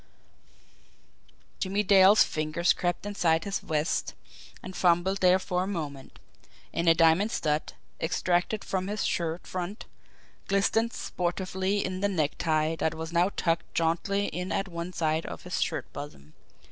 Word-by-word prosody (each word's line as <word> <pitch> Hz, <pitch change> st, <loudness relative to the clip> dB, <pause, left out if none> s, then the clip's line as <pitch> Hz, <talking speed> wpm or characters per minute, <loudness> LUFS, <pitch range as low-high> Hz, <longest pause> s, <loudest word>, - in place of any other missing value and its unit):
Jimmie 200 Hz, +1 st, 0 dB
Dale's 200 Hz, +1 st, +7 dB
fingers 155 Hz, +3 st, +1 dB
crept 175 Hz, +2 st, -2 dB
inside 170 Hz, -6 st, +1 dB
his 200 Hz, -1 st, -2 dB
vest 155 Hz, 0 st, -1 dB, 0.5 s
and 185 Hz, -, -8 dB
fumbled 180 Hz, +2 st, +2 dB
there 180 Hz, 0 st, +5 dB
for 180 Hz, -1 st, -2 dB
a 185 Hz, -, -2 dB
moment 145 Hz, -8 st, -5 dB, 0.6 s
and 170 Hz, 0 st, +2 dB
a 165 Hz, -, +6 dB
diamond 165 Hz, +6 st, +4 dB
stud, 150 Hz, -6 st, -1 dB, 0.3 s
extracted 175 Hz, +5 st, 0 dB
from 190 Hz, -1 st, -2 dB
his 210 Hz, +1 st, -2 dB
shirt 170 Hz, 0 st, -2 dB
front, 185 Hz, +4 st, -5 dB, 0.6 s
glistened 220 Hz, +4 st, +2 dB
sportively 185 Hz, +3 st, -2 dB
in 185 Hz, 0 st, -3 dB
the 200 Hz, -, +2 dB
necktie 155 Hz, -2 st, 0 dB
that 160 Hz, -, 0 dB
was 160 Hz, +1 st, -6 dB
now 175 Hz, +2 st, +3 dB
tucked 165 Hz, -1 st, -1 dB
jauntily 175 Hz, +5 st, +1 dB
in 180 Hz, +2 st, -4 dB
at 195 Hz, -, -1 dB
one 170 Hz, 0 st, -5 dB
side 160 Hz, -2 st, -1 dB
of -, -, -8 dB
his -, -, -3 dB
shirt -, -, -2 dB
bosom. 75 Hz, 0 st, -9 dB
175 Hz, 145 wpm, -28 LUFS, 160-195 Hz, 0.6 s, Dale's